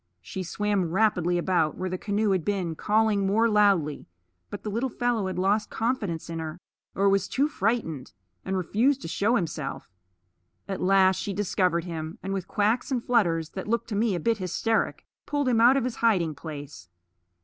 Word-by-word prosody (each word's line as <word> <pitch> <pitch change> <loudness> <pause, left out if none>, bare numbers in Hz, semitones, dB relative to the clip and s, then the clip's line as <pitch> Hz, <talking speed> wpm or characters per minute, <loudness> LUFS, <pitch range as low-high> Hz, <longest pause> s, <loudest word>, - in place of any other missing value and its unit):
She 190 - -5
swam 195 0 -1
rapidly 180 -2 +2
about 175 -3 +1
where 185 - -3
the 185 - -3
canoe 205 0 0
had 185 -4 +1
been, 185 -4 -1
calling 210 +2 +1
more 225 +4 +3
loudly; 200 -9 +2 0.4
but - - -7
the 210 - -3
little 235 +5 -1
fellow 240 -4 -1
had 185 - -4
lost 200 +3 +1
confidence 220 -8 -2
in 165 -1 -5
her, 160 +1 -6 0.4
or 200 +1 +2
was 195 -1 +2
too 280 +3 +1
frightened, 200 - -2 0.3
and 190 - -2
refused 245 +10 +1
to - - -4
show 205 +8 +1
himself. 155 - -3 0.8
At 195 -1 -4
last 190 0 +4
she 200 - -3
discovered 180 -3 +1
him, 165 -2 -6
and 195 +1 -3
with 190 -3 -3
quacks 215 +4 +1
and 250 -4 -1
flutters 170 -10 +1
that 190 - -6
looked 235 +2 -1
to 210 - -3
me 210 -1 +1
a - - -2
bit 225 +5 0
hysteric 220 +5 -1 0.2
pulled 290 -2 0
him 235 -3 +3
out 250 +4 +6
of 270 - +1
his 250 -1 -3
hiding 185 -9 +2
place. 145 - -9
195 Hz, 185 wpm, -26 LUFS, 170-225 Hz, 0.8 s, out